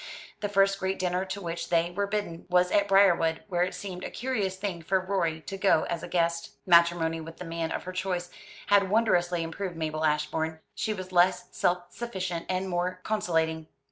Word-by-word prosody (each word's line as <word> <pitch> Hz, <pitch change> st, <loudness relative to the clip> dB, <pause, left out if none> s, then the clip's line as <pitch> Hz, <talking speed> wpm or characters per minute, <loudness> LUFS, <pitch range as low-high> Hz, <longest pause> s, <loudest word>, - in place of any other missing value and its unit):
The 205 Hz, -, -2 dB
first 195 Hz, 0 st, +3 dB
great 190 Hz, 0 st, -1 dB
dinner 180 Hz, 0 st, 0 dB
to 190 Hz, +1 st, -5 dB
which 170 Hz, -2 st, -4 dB
they 170 Hz, 0 st, +2 dB
were 200 Hz, +3 st, -1 dB
bidden 200 Hz, -5 st, -3 dB
was 180 Hz, 0 st, +3 dB
at 200 Hz, -1 st, +3 dB
Briarwood, 175 Hz, -5 st, +4 dB
where 175 Hz, -2 st, 0 dB
it 180 Hz, +1 st, 0 dB
seemed 180 Hz, -1 st, -6 dB
a -, -, -4 dB
curious 220 Hz, -7 st, -2 dB
thing 190 Hz, -3 st, -4 dB
for 190 Hz, +4 st, +1 dB
Rorie 180 Hz, -4 st, -1 dB
to 195 Hz, +6 st, -6 dB
go 190 Hz, -5 st, +4 dB
as 170 Hz, -2 st, -2 dB
a -, -, -6 dB
guest. 170 Hz, -1 st, 0 dB
Matrimony 170 Hz, -2 st, +4 dB
with 165 Hz, +1 st, -9 dB
the 180 Hz, -, -7 dB
man 165 Hz, 0 st, -3 dB
of -, -, -3 dB
her 185 Hz, -, -5 dB
choice 180 Hz, -1 st, -2 dB, 0.3 s
had 200 Hz, -1 st, +4 dB
wondrously 180 Hz, -6 st, +2 dB
improved 175 Hz, +2 st, -4 dB
Mabel 155 Hz, -1 st, -2 dB
Ashbourne. 155 Hz, +1 st, 0 dB
She 215 Hz, -, -2 dB
was 185 Hz, -3 st, -5 dB
less 180 Hz, 0 st, +3 dB
self 175 Hz, 0 st, 0 dB
sufficient 185 Hz, -8 st, -4 dB
and 185 Hz, +1 st, -1 dB
more 180 Hz, 0 st, -1 dB
conciliating. 160 Hz, -6 st, 0 dB
180 Hz, 195 wpm, -28 LUFS, 165-195 Hz, 0.3 s, Briarwood